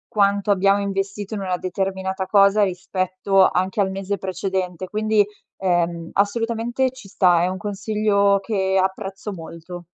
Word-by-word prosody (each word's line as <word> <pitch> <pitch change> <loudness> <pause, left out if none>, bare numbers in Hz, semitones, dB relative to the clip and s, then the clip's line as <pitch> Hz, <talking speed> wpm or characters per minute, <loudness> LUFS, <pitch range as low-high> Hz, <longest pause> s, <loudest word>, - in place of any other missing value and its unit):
quanto 200 0 +2
abbiamo 200 0 +4
investito 200 +1 -3
in 200 - -4
una 185 -2 -1
determinata 190 +1 -2
cosa, 200 +1 +5
rispetto 185 +1 +1
anche 185 +3 0
al 190 - +1
mese 195 +1 -3
precedente 185 -1 -3
quindi, 215 0 +2 0.3
ehm, 175 -2 0
assolutamente, 230 +5 0
ci 255 -6 -13
sta. 175 -4 +3
È - - +2
un 185 +1 -3
consiglio 205 0 +1
che 190 -2 0
apprezzo 195 +1 -3
molto. 170 +1 -9
195 Hz, 140 wpm, -22 LUFS, 185-205 Hz, 0.3 s, cosa